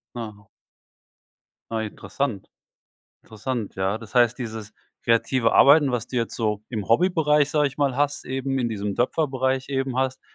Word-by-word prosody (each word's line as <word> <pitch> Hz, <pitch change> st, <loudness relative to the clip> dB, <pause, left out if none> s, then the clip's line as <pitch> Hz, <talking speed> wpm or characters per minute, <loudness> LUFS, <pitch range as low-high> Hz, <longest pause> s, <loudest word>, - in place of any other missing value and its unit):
Ah. 105 Hz, -4 st, -8 dB, 1.2 s
Ah, 110 Hz, -1 st, -1 dB
interessant 105 Hz, +1 st, -4 dB, 0.7 s
interessant. 110 Hz, 0 st, -5 dB
Ja, 95 Hz, +3 st, -1 dB
das 115 Hz, +1 st, -13 dB
heißt, 120 Hz, -1 st, +4 dB
dieses 110 Hz, -3 st, -6 dB, 0.3 s
kreative 115 Hz, +1 st, +2 dB
Arbeiten, 145 Hz, 0 st, +6 dB
was 120 Hz, -2 st, -2 dB
du 125 Hz, -, -6 dB
jetzt 115 Hz, -2 st, -2 dB
so 105 Hz, -2 st, -1 dB
im 110 Hz, -5 st, -4 dB
Hobbybereich, 150 Hz, +1 st, +3 dB
sage 150 Hz, -1 st, +2 dB
ich 135 Hz, -1 st, -5 dB
mal 140 Hz, -3 st, 0 dB
hast, 145 Hz, 0 st, 0 dB
eben 135 Hz, +1 st, -2 dB
in 120 Hz, -, 0 dB
diesem 105 Hz, -2 st, -3 dB
Töpferbereich 130 Hz, 0 st, 0 dB
eben 135 Hz, -2 st, -2 dB
hast, 130 Hz, 0 st, -1 dB
125 Hz, 150 wpm, -24 LUFS, 110-135 Hz, 1.2 s, Arbeiten